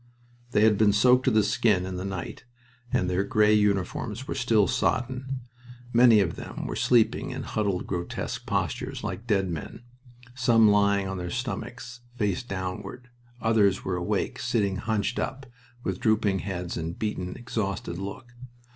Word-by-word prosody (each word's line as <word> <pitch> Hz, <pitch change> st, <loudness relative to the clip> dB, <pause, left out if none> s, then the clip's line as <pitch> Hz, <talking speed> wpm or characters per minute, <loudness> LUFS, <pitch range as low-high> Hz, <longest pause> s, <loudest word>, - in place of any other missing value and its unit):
They 105 Hz, -, +2 dB
had 110 Hz, -2 st, +4 dB
been 105 Hz, -2 st, +5 dB
soaked 125 Hz, +5 st, +4 dB
to -, -, +5 dB
the 110 Hz, -3 st, +3 dB
skin 100 Hz, -2 st, +2 dB
in 95 Hz, 0 st, -5 dB
the 90 Hz, -, -4 dB
night 95 Hz, -2 st, -5 dB, 0.5 s
and 90 Hz, -, +1 dB
their 90 Hz, +2 st, +1 dB
gray 105 Hz, 0 st, +3 dB
uniforms 105 Hz, +4 st, 0 dB
were -, -, -2 dB
still 115 Hz, -6 st, +3 dB
soddened. 130 Hz, +6 st, -1 dB, 0.6 s
Many 120 Hz, -3 st, +7 dB
of 85 Hz, -4 st, -1 dB
them -, -, -6 dB
were -, -, -4 dB
sleeping, 120 Hz, -3 st, +2 dB
in -, -, -5 dB
huddled, 100 Hz, -4 st, -1 dB
grotesque 85 Hz, 0 st, -4 dB
postures, -, -, -2 dB
like 115 Hz, -, -5 dB
dead 95 Hz, -4 st, +1 dB
men, 80 Hz, +7 st, -7 dB, 0.5 s
some 120 Hz, -3 st, +4 dB
lying 100 Hz, -1 st, +3 dB
on 95 Hz, -1 st, -4 dB
their 90 Hz, 0 st, -4 dB
stomachs, 125 Hz, +2 st, -5 dB, 0.2 s
face 105 Hz, -4 st, 0 dB
downward. 100 Hz, +4 st, -6 dB, 0.3 s
Others 105 Hz, -4 st, +2 dB
were 95 Hz, -, -1 dB
awake, 95 Hz, +3 st, -2 dB
sitting 110 Hz, -5 st, 0 dB
hunched 110 Hz, +2 st, -1 dB
up, 135 Hz, +1 st, -3 dB, 0.4 s
with 95 Hz, -1 st, -2 dB
drooping 105 Hz, -3 st, +2 dB
heads 90 Hz, -3 st, -4 dB
and 80 Hz, +1 st, -4 dB
a -, -, -20 dB
beaten, 90 Hz, -4 st, -3 dB
exhausted 100 Hz, -7 st, -3 dB
look. 100 Hz, +5 st, -7 dB
105 Hz, 160 wpm, -27 LUFS, 95-120 Hz, 0.6 s, Many